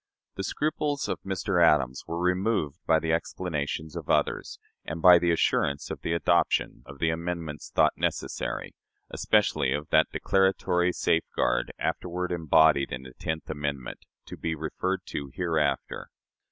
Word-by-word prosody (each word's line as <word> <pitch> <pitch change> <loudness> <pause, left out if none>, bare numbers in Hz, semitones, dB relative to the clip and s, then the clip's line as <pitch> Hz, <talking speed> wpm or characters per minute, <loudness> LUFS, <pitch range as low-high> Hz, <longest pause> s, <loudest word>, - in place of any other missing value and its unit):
The 95 - -5
scruples 145 - -1
of - - -3
Mr. 95 -2 0
Adams 65 -6 +3
were 85 +1 -3
removed 90 -3 0
by 80 - +5
the 80 0 0
explanations 80 -2 -3
of - - -7
others, - - 0 0.3
and 80 - -5
by 90 +1 +8
the 85 0 +1
assurance 70 -3 +1
of - - -6
the 80 - -1
adoption 85 +1 +1
of 70 0 -10
the 80 +3 +1
amendments 85 -2 -4
thought - - +3
necessary - - -3 0.4
especially 65 -1 +2
of 75 +1 -4
that - - +4
declaratory 95 -2 +2
safeguard - - 0
afterward 90 0 -2
embodied 80 -4 +3
in 65 +1 -5
the 65 -1 -12
tenth 80 0 -3
amendment 70 -4 -4 0.3
to - - -8
be 80 -1 -2
referred 90 +5 -2
to 70 -1 -4
hereafter. 80 -6 -1
80 Hz, 145 wpm, -27 LUFS, 75-90 Hz, 0.4 s, by